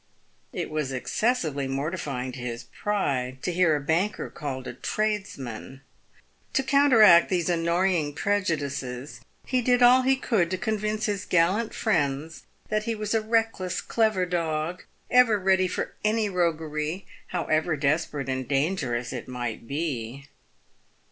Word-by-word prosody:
It - - -4
was 155 -3 -2
excessively 150 - -1
morti 140 +7 -2
fying 130 -5 -4
to 130 - -8
his 120 -1 -5
pride 130 - -2
to - - 0
hear 170 -3 +3
a - - 0
banker 165 +9 -1
called 135 -4 -5
a - - -5
tradesman. 135 - -3 0.7
To 270 - +2
coun 280 +2 +4
teract 210 -9 +7
these 180 -2 0
annoying 170 -2 +1
prejudices, 145 -10 -2 0.2
he 255 -1 +1
did 245 0 +3
all 250 +1 +7
he 265 +1 +3
could 220 -10 +1
to 185 - -2
convince 215 0 -1
his 205 -3 -2
gallant 185 +6 +2
friends 155 -5 -1 0.2
that 215 0 0
he 230 - -1
was 215 0 -3
a 225 - +2
reckless, 220 -5 0
clever 215 -5 +1
dog, 170 -1 -2 0.3
ever 250 -4 +5
ready 190 -1 +3
for - - -3
any 215 0 +2
roguery, 160 -1 -1 0.2
however 160 -2 0
desperate 145 -1 0
and 130 -1 -2
dangerous 135 -5 -1
it 125 - -6
might 120 -2 -5
be. 140 -3 -4
170 Hz, 140 wpm, -26 LUFS, 140-210 Hz, 0.7 s, teract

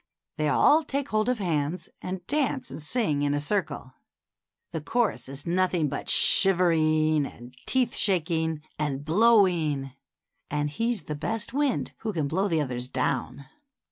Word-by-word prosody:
They 155 -1 0
all 300 - +5
take 280 -1 -3
hold 215 +2 +1
of 250 - +1
hands 165 -3 -2
and 185 -1 -6
dance 280 0 -1
and 155 - -8
sing 155 - -1
in 145 0 +1
a - - 0
circle. 150 -5 -3 0.8
The 160 - -4
chorus 200 - -1
is 135 +1 -8
nothing 175 -3 +1
but 140 - -5
shivering 155 -5 +4
and 120 +1 -13
teeth 255 -3 +1
shaking 160 -5 0 0.2
and 145 -2 -2
blowing, 165 - +3 0.6
and 150 0 -2
he's 230 +3 -2
the 150 - -5
best 220 +10 -4
wind 285 -2 0
who 220 -2 -4
can 155 -5 -1
blow 190 +7 0
the 165 -5 +1
others 125 -3 -3
down. 130 +1 -2
160 Hz, 150 wpm, -26 LUFS, 145-210 Hz, 0.8 s, all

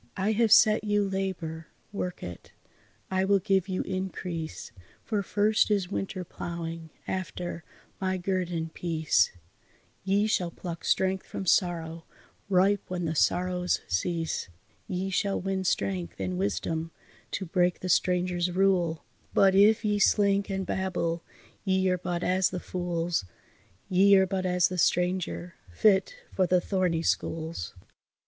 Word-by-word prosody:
I 195 +3 +1
have 220 0 +2
set 215 0 +6
you 205 -1 +1
labour, 185 -5 -3 0.2
work 180 -3 -4
it; 90 -1 -9 0.6
I 190 0 +2
will 200 +1 +4
give 195 -1 +1
you 185 - -1
increase, 180 -6 -5 0.3
For 210 -3 -1
first 210 +2 +2
is 200 -3 0
winter 195 -1 -3
ploughing, 165 -1 -6 0.2
after, 180 -2 -4 0.4
my 190 -1 0
guerdon, 175 -3 -2
peace; 160 - +1 0.7
Ye 200 +2 +2
shall 185 -5 +1
pluck 170 0 -7
strength 190 0 +1
from 195 - -5
sorrow, 165 -3 +1 0.4
ripe 195 +1 +3
when 180 -1 -3
the 160 - -1
sorrows 180 +2 +1
cease; 165 - -1 0.4
Ye 190 -1 -2
shall 200 +1 0
win 190 0 -2
strength 95 - -1
and 90 -1 -2
wisdom 100 - -2 0.4
to 195 - -2
break 180 +1 +1
the 185 - -3
stranger's 180 0 +1
rule, 180 -3 +2 0.3
But 195 -1 +5
if 210 +3 +5
ye 210 -1 +1
slink 200 0 +3
and 190 -1 -2
babble 175 -3 -2 0.4
ye 190 -1 +2
are 180 - 0
but 175 0 -3
as 185 0 +2
the 185 - -4
fools, 175 - -2 0.6
Ye 195 +2 +5
are 190 - +5
but 185 0 -2
as 180 -1 +3
the 180 -1 -3
stranger, 175 - 0 0.2
fit 195 - +3 0.2
for 185 -2 +1
the 180 +1 +4
thorny 175 -3 0
schools." 160 - -2
180 Hz, 140 wpm, -28 LUFS, 170-195 Hz, 0.7 s, set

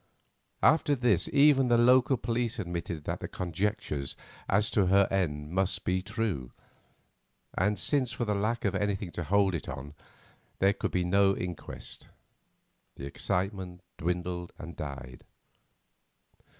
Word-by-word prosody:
After 145 -2 +4
this 120 -9 +2
even 140 -2 +5
the 120 -1 +4
local 125 +2 +5
police 120 0 -1
admitted 85 -5 -4
that - - -3
the - - -5
conjectures 85 - -2 0.3
as 105 +3 +2
to 100 -4 +3
her 100 +1 +5
end 75 -6 -1
must 95 +1 0
be 95 +1 +1
true, 105 - -3 1.0
and, 105 +3 +1
since 130 +2 +1
for 120 - -2
the 105 - 0
lack 110 +4 -1
of 100 - +1
anything 100 -2 -1
to 85 +1 -4
hold 95 +3 +3
it 85 - -4
on 70 +3 -7 0.6
there 100 +1 +4
could 100 - -2
be 90 - 0
no 95 +2 +3
inquest, 90 -3 -6 0.9
the 70 - -7
excitement 90 +4 -2 0.2
dwindled 90 0 -2
and 85 0 -8
died. 65 -4 -7
95 Hz, 135 wpm, -29 LUFS, 85-110 Hz, 1.0 s, even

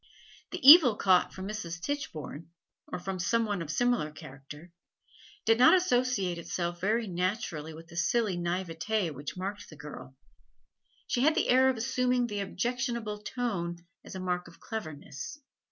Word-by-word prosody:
The 355 -7 -3
evil 290 -7 +10
caught 185 -3 +3
from 190 0 -7
Mrs. 175 -5 -5
Tichborne, 165 - -5 0.4
or - - -5
from 185 +1 -5
some 230 +6 +1
one 205 -4 -2
of 160 - -6
similar 245 -4 +1
character, 145 +3 -12 0.7
did 225 +1 +4
not 255 +8 +8
associate 245 - +1
itself 175 0 -4
very 220 +4 +1
naturally 180 -4 -3
with 160 +1 -11
the 170 - -14
silly 195 +3 +1
naivete 175 +2 -2
which 145 +4 -7
marked 200 +2 -5
the 155 - -12
girl; 145 -3 -10 0.9
she 245 - -1
had 310 +4 +4
the 360 - +1
air 260 +1 +5
of 260 - -1
assuming 250 +1 +1
the 210 -3 -4
objectionable 235 +1 -2
tone 200 -7 -3 0.3
as - - -10
a - - -4
mark 180 -1 -2
of 170 - -16
cleverness. 155 - -7
195 Hz, 155 wpm, -29 LUFS, 170-240 Hz, 0.9 s, evil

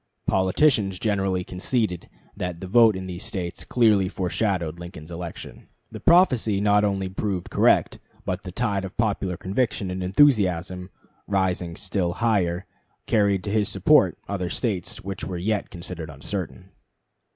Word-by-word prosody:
Politicians 95 +1 +2
generally 95 -3 0
conceded 90 0 -2 0.3
that 90 -2 -4
the 95 - -6
vote 110 +2 +5
in 95 0 -5
these 90 0 -6
States 95 -6 -4
clearly 105 -6 +3
foreshadowed 90 -3 -1
Lincoln's 85 -2 -9
election. 85 -1 -8 0.2
The - - -7
prophecy 130 - +4
not 105 0 +3
only 100 -2 0
proved 95 -1 -3
correct, - - +3 0.3
but 90 +1 -2
the 90 - -8
tide 100 -1 -1
of 95 0 -8
popular 100 -5 0
conviction 100 -1 -1
and 95 0 -4
enthusiasm, 90 - +2 0.4
rising 90 -3 0
still 95 -2 -1
higher, 95 -6 0 0.4
carried 100 -3 +2
to 100 - -3
his 105 -1 +1
support 95 -3 +4
other 90 -3 -2
States 100 -4 -3
which 95 -1 -5
were 90 -1 -4
yet 105 +4 -1
considered 85 -3 -7
uncertain. 90 +5 -6
95 Hz, 140 wpm, -24 LUFS, 90-105 Hz, 0.4 s, vote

